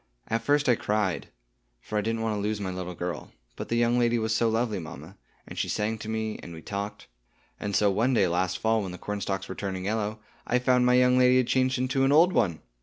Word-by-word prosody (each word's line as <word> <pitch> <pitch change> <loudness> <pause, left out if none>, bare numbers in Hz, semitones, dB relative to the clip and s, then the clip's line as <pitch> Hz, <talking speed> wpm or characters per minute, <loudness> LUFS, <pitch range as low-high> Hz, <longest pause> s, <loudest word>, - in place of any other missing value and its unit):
At 115 0 0
first 145 +5 +2
I 125 - +6
cried, 105 -5 -1 0.5
for 110 - -8
I 105 - +2
didn't 115 +1 -2
want 110 -1 0
to 105 - -2
lose 105 +1 -1
my 95 -2 -3
little 90 -1 -5
girl; 90 -3 -5 0.2
but - - -7
the 115 - 0
young 120 +1 +2
lady 120 0 +2
was 110 -1 0
so 115 0 +2
lovely, 110 -2 0
mamma, 85 +2 -9 0.3
and - - -7
she - - -1
sang 110 +1 -1
to 110 - -7
me, 110 -1 -3
and 85 - -9
we 80 - -11
talked; 100 0 -5 0.5
and 100 -1 -3
so 105 -1 +4
one 120 +6 +1
day 100 -4 +4
last 90 +1 0
fall, 110 +1 +1
when 95 -3 -5
the - - -7
cornstalks 95 -1 -3
were - - -5
turning 95 -1 -4
yellow, 110 +1 -2 0.3
I 125 - +2
found 125 0 +3
my 125 - +5
young 125 0 +4
lady 125 0 +5
had 130 - +3
changed 130 0 +2
into 130 +1 0
an 135 - +3
old 170 +5 +5
one. 85 - +1
110 Hz, 245 wpm, -27 LUFS, 95-120 Hz, 0.5 s, I